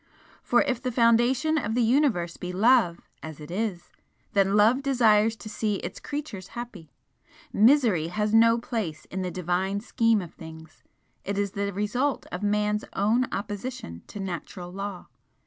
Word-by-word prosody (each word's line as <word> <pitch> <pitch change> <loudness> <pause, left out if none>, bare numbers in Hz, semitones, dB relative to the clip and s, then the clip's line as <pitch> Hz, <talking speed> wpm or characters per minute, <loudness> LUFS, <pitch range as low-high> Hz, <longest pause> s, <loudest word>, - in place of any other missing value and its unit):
For 240 - +3
if 255 -2 -2
the 255 - -2
foundation 245 +6 +3
of 220 -3 -3
the 245 - +3
Universe 225 - +2
be 180 - -6
Love, 200 -3 +3 0.2
as 160 -1 -8
it 150 +2 -10
is, 190 -2 -3 0.4
then 195 0 +3
Love 225 +6 +4
desires 225 -5 +3
to 220 - -11
see 215 -1 -1
its - - -6
creatures 285 - -6
happy. 215 -10 -8 0.6
Misery 220 - +4
has 210 +4 -1
no 230 +1 +6
place 220 -10 -4
in 190 - -3
the 185 - -2
Divine 185 +3 -1
scheme 230 0 +2
of 175 -4 -8
things 160 -1 -12 0.4
it 200 +1 -3
is 200 -1 0
the 200 0 -2
result 225 +8 -1
of 180 - -5
Man's 210 0 0
own 225 +5 +2
opposition 205 - -5
to 205 - -9
Natural 180 -1 -6
Law. 195 -1 -6
210 Hz, 160 wpm, -26 LUFS, 185-235 Hz, 0.6 s, no